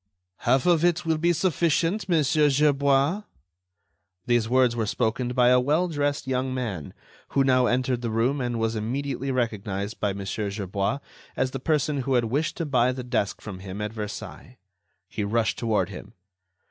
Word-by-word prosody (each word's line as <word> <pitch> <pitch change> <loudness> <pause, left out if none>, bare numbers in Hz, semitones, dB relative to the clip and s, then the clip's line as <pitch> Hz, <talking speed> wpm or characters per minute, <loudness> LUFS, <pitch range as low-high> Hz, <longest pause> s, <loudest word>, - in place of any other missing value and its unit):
"Half 130 +2 +2
of 170 -2 +4
it 175 0 +2
will 160 -1 +1
be 170 +2 +3
sufficient, 175 +3 +1
Monsieur 150 -2 +3
Gerbois." 140 +4 +2 1.0
These 120 -2 +1
words 125 -1 +3
were 115 -2 -1
spoken 110 +4 0
by 125 -1 +4
a 125 0 +6
well 150 +8 +2
dressed 145 -2 -1
young 130 0 -1
man 100 - -4 0.3
who 135 - +2
now 130 -2 +3
entered 125 0 0
the 120 - -2
room 120 +6 +1
and 120 -1 -2
was 115 0 0
immediately 135 +4 -3
recognized 110 -4 -2
by 105 -2 0
Mon. 100 0 -6
Gerbois 100 +4 -2 0.4
as 130 -1 0
the 135 - -4
person 150 +1 0
who 135 0 0
had 120 -1 +3
wished 140 +8 -1
to 165 - -2
buy 125 -3 +2
the 130 0 -5
desk 120 -5 -1
from 100 -4 -7
him 95 +1 -7
at 105 +1 -3
Versailles. 110 +3 -7 0.5
He 105 - -4
rushed 110 +2 0
toward 105 -6 +1
him. 100 +2 -10
125 Hz, 170 wpm, -25 LUFS, 110-145 Hz, 1.0 s, a